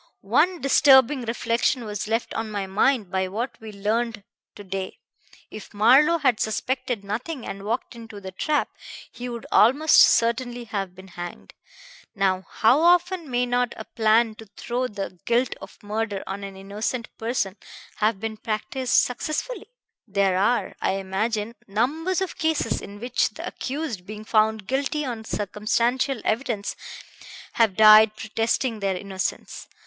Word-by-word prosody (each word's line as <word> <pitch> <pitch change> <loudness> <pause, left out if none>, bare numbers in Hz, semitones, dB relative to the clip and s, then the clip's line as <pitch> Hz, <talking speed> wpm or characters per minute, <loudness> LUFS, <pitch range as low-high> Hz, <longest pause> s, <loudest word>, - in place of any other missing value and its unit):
One 340 +7 +3
disturbing 265 -1 +5
reflection 235 +1 0
was 210 -1 -4
left 225 +2 -1
on 225 -1 -3
my 205 -2 -3
mind 205 +1 +1
by 190 0 0
what 225 +7 -3
we 220 -1 -8
learned 215 +2 -2 0.3
to 205 - -10
day. 190 -1 -5 0.5
If 215 -1 -10
Marlowe 270 +10 +5
had 260 -8 +2
suspected 250 0 -2
nothing 240 +7 -4
and 195 - -6
walked 225 +4 -3
into 225 -3 -10
the 190 -1 -8
trap, 295 +10 0 0.4
he 245 +1 -7
would 235 -1 -6
almost 285 +8 +5
certainly 240 +1 +3
have 195 -5 -4
been 190 +1 -13
hanged. 175 0 -8 0.6
Now 190 -2 0
how 235 +6 +3
often 350 -1 +3
may 245 0 +1
not 245 0 0
a - - -7
plan 220 0 +2
to 220 - -11
throw 250 +2 -2
the 195 -5 -6
guilt 240 +2 +1
of - - -11
murder 210 -1 -3
on 200 +1 -5
an 195 -1 -8
innocent 210 +5 -4
person 225 -4 -1 0.4
have 215 -1 +1
been 220 +1 -4
practised 230 +4 -2
successfully? 310 - 0 0.4
There 195 -2 +1
are, 235 +5 +1
I - - +1
imagine, 210 +3 -2
numbers 305 - 0
of 380 - -4
cases 315 -7 0
in 205 +1 -10
which 245 +2 0
the - - -6
accused, 260 - -5
being 215 +1 -8
found 220 -1 +2
guilty 280 +4 -1
on 230 -4 -5
circumstantial 230 +5 0
evidence, 220 -3 -1 0.8
have 225 -5 +2
died 215 0 +8
protesting 225 +2 -1
their 195 -2 -1
innocence. 190 0 -5
225 Hz, 150 wpm, -24 LUFS, 205-250 Hz, 0.8 s, died